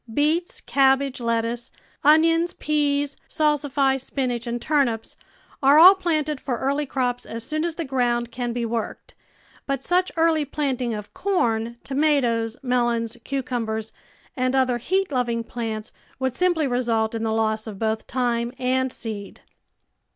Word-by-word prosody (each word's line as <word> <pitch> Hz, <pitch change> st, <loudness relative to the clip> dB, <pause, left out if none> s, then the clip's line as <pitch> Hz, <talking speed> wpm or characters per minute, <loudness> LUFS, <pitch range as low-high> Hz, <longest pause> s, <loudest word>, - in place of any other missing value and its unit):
Beets, 310 Hz, +8 st, 0 dB
cabbage, 270 Hz, -1 st, +2 dB
lettuce, 230 Hz, +1 st, -1 dB, 0.3 s
onions, 330 Hz, +3 st, +4 dB
peas, 290 Hz, -2 st, 0 dB
salsify, 285 Hz, -3 st, +1 dB
spinach, 250 Hz, -2 st, -3 dB
and 235 Hz, 0 st, -2 dB
turnips 240 Hz, -6 st, 0 dB, 0.5 s
are 275 Hz, +2 st, +6 dB
all 360 Hz, +4 st, +10 dB
planted 310 Hz, -6 st, -1 dB
for 250 Hz, -4 st, -2 dB
early 280 Hz, +4 st, -1 dB
crops 250 Hz, -2 st, -1 dB
as 230 Hz, 0 st, -6 dB
soon 310 Hz, +5 st, -2 dB
as 335 Hz, -1 st, -2 dB
the 335 Hz, -, -3 dB
ground 240 Hz, -3 st, 0 dB
can 245 Hz, 0 st, -3 dB
be 235 Hz, 0 st, -2 dB
worked, 230 Hz, -1 st, -4 dB, 0.5 s
but 275 Hz, -1 st, -2 dB
such 365 Hz, +1 st, +1 dB
early 325 Hz, -2 st, +3 dB
planting 265 Hz, -5 st, -2 dB
of 210 Hz, -1 st, -8 dB
corn, 235 Hz, -, 0 dB
toma 290 Hz, +2 st, +2 dB
toes, 230 Hz, -2 st, -1 dB
melons, 240 Hz, -2 st, 0 dB
cucumbers, 230 Hz, -5 st, -3 dB, 0.4 s
and 255 Hz, 0 st, 0 dB
other 255 Hz, -2 st, +2 dB
heat 380 Hz, +8 st, 0 dB
loving 240 Hz, -3 st, 0 dB
plants 225 Hz, -2 st, -5 dB, 0.3 s
would 260 Hz, -1 st, -1 dB
simply 345 Hz, 0 st, +1 dB
result 235 Hz, -4 st, 0 dB
in 225 Hz, -, -3 dB
the 225 Hz, -, 0 dB
loss 220 Hz, 0 st, 0 dB
of 210 Hz, -3 st, -7 dB
both 220 Hz, +1 st, -2 dB
time 240 Hz, -1 st, 0 dB
and 260 Hz, 0 st, 0 dB
seed. 215 Hz, -5 st, -7 dB
255 Hz, 145 wpm, -23 LUFS, 235-290 Hz, 0.5 s, all